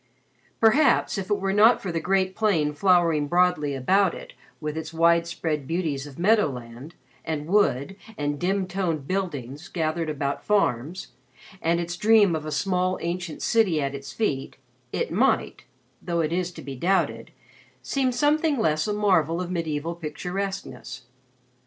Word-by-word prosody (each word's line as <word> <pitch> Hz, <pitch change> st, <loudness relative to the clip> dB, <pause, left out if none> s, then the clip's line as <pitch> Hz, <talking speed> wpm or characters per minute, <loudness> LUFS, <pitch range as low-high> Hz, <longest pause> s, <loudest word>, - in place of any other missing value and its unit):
Perhaps, 240 Hz, -1 st, +3 dB
if 190 Hz, -, -6 dB
it 205 Hz, -, +1 dB
were 195 Hz, 0 st, -1 dB
not 220 Hz, +4 st, +6 dB
for 190 Hz, -, -4 dB
the 165 Hz, -, -1 dB
great 190 Hz, +2 st, 0 dB
plain 170 Hz, -9 st, +1 dB
flowering 170 Hz, -3 st, +3 dB
broadly 175 Hz, -4 st, +2 dB
about 185 Hz, +8 st, +2 dB
it -, -, -10 dB, 0.3 s
with 150 Hz, -1 st, -4 dB
its 160 Hz, 0 st, -5 dB
wide 170 Hz, +1 st, +3 dB
spread 155 Hz, -5 st, -3 dB
beauties 155 Hz, -4 st, -2 dB
of 140 Hz, -, -12 dB
meadow 210 Hz, +3 st, +4 dB
land, 125 Hz, +4 st, -9 dB, 0.3 s
and 155 Hz, -2 st, -3 dB
wood, 190 Hz, -3 st, +1 dB, 0.2 s
and 145 Hz, -1 st, -2 dB
dim 190 Hz, +2 st, 0 dB
toned 175 Hz, -7 st, -2 dB
buildings 150 Hz, -6 st, -4 dB
gathered 160 Hz, -1 st, -2 dB
about 140 Hz, -2 st, -3 dB
farms, 180 Hz, -, 0 dB, 0.5 s
and 170 Hz, +1 st, +1 dB
its 175 Hz, 0 st, -3 dB
dream 210 Hz, -2 st, +4 dB
of 155 Hz, -1 st, -4 dB
a -, -, -4 dB
small 185 Hz, +1 st, 0 dB
ancient 170 Hz, -1 st, -4 dB
city 210 Hz, -9 st, +2 dB
at 140 Hz, -1 st, -2 dB
its 140 Hz, 0 st, -7 dB
feet, 145 Hz, -12 st, -2 dB, 0.3 s
it -, -, -2 dB
might -, -, +1 dB, 0.4 s
though 170 Hz, -1 st, -1 dB
it 160 Hz, 0 st, -1 dB
is 180 Hz, 0 st, -1 dB
to -, -, -10 dB
be 135 Hz, -1 st, -6 dB
doubted 185 Hz, +9 st, 0 dB, 0.5 s
seem 265 Hz, -2 st, 0 dB
something 295 Hz, +3 st, +2 dB
less 155 Hz, -6 st, +1 dB
a 210 Hz, -, 0 dB
marvel 180 Hz, -6 st, +2 dB
of 180 Hz, 0 st, -4 dB
medieval 165 Hz, -2 st, -2 dB
picturesqueness. 170 Hz, -6 st, -5 dB
170 Hz, 160 wpm, -25 LUFS, 150-195 Hz, 0.5 s, not